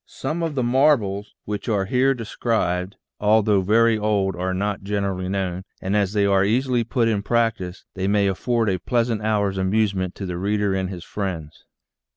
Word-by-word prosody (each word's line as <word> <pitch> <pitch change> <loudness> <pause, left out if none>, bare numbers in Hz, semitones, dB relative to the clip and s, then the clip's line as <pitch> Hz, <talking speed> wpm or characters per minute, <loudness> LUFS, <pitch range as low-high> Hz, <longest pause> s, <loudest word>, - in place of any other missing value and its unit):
Some 155 +6 -4
of 165 -3 -2
the 130 - 0
marvels 120 -6 +2
which 105 +2 -4
are 100 -3 +1
here 130 +6 +2
described, 100 -5 -1 0.2
although 105 -1 +3
very 110 +3 +3
old, 100 -3 +1
are 90 +1 -2
not 100 +2 -2
generally 100 -2 -2
known, 95 -2 -2 0.2
and 95 +2 -2
as 100 -1 +1
they 100 -2 +2
are 100 -1 +3
easily 120 +3 +1
put 115 0 0
in 105 -3 +1
practice 110 -5 -1
they 95 0 -2
may 100 0 +3
afford 115 +4 0
a 95 -2 0
pleasant 115 0 0
hour's 100 -3 0
amusement 95 -1 0
to 100 - -5
the 90 -2 -4
reader 100 +1 0
and 95 -1 -1
his 90 -3 -7
friends. 90 -7 -5
100 Hz, 180 wpm, -23 LUFS, 95-115 Hz, 0.2 s, although